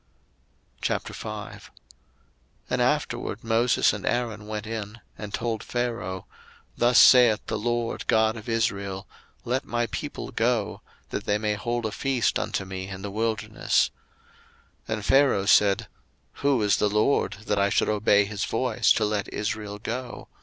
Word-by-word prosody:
02:005:001 - - -4 1.0
And - - +1
afterward 105 - -1
Moses 115 +2 +3
and 105 - -6
Aaron 110 -4 -2
went 105 0 -4
in, 110 0 -6 0.2
and 105 -1 -7
told 115 -1 -2
Pharaoh, 120 -7 -3 0.5
Thus 120 0 +3
saith 120 -4 +7
the 110 - -3
LORD 120 +1 -2
God 110 0 +3
of 115 +1 -8
Israel, 100 -4 -1 0.4
Let 130 +3 0
my 120 0 -1
people 145 +2 -5
go, 115 -3 0 0.3
that - - -4
they 105 - +2
may 105 0 -1
hold 120 +3 -2
a 110 - -1
feast 130 +1 0
unto 95 - -2
me 95 0 -6
in 95 -1 -8
the 100 - -4
wilderness. 110 +1 0 1.0
02:005:002 110 - -1
And 105 -2 -6
Pharaoh 135 -7 +4
said, 100 -1 +4 0.5
Who 140 -3 +3
is 105 - +3
the 105 - +2
LORD, 105 +7 +2
that 105 - 0
I 100 0 +3
should - - +2
obey 105 -1 +3
his 105 0 -4
voice 115 -1 +1
to 110 - +1
let 105 -1 -2
Israel 105 0 -3
go? 120 +4 -6
110 Hz, 150 wpm, -26 LUFS, 105-120 Hz, 1.0 s, saith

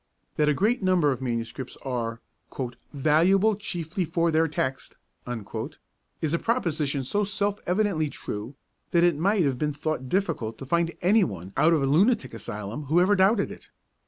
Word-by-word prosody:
That 150 -1 +3
a 150 - +2
great 220 - +1
number 180 -6 +3
of 130 - -3
manuscripts 120 0 -4
are 120 -3 -3 0.7
'valuable 170 +9 +3
chiefly 180 -3 -3
for 170 0 +1
their 160 +1 +3
text' 135 -3 -3 1.3
is 155 0 0
a 170 - +2
proposition 155 - 0
so 205 +11 0
self 200 0 -1
evidently 180 -5 +1
true, 110 +1 -6 0.3
that 170 0 +3
it 175 -2 +4
might 190 +5 +2
have 135 -4 0
been 150 -1 0
thought 145 -3 -3
difficult 155 - -1
to 135 - -8
find 170 +4 +1
any 205 +4 +5
one 95 - -5
out 165 +2 +4
of 155 -4 +2
a - - +3
lunatic 165 - +3
asylum 105 +4 -6
who 160 +5 +3
ever 190 +3 +4
doubted 200 +2 +3
it. - - -11
160 Hz, 165 wpm, -26 LUFS, 135-190 Hz, 1.3 s, any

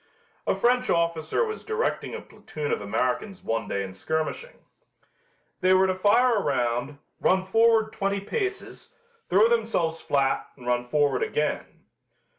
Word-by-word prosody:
A - - +2
French 250 +1 +2
officer 170 - +1
was 435 0 -6
directing 450 +2 -2
a - - -6
platoon 150 -1 -6
of - - -1
Americans 125 - -2
one 115 -2 -2
day 100 - -2
in 95 -1 -7
skirmishing. 160 - -4 0.9
They 185 0 +4
were 190 0 +5
to 185 - +1
fire 215 +5 +3
a - - +1
round, 125 0 -1 0.2
run 185 0 +2
forward 225 +2 +3
twenty 200 0 -1
paces, 385 - -4 0.3
throw 205 +5 +5
themselves 220 -9 0
flat 135 -1 0
and 125 - -13
run 125 0 0
forward 145 -1 +1
again. 150 0 -2
185 Hz, 145 wpm, -26 LUFS, 135-225 Hz, 0.9 s, were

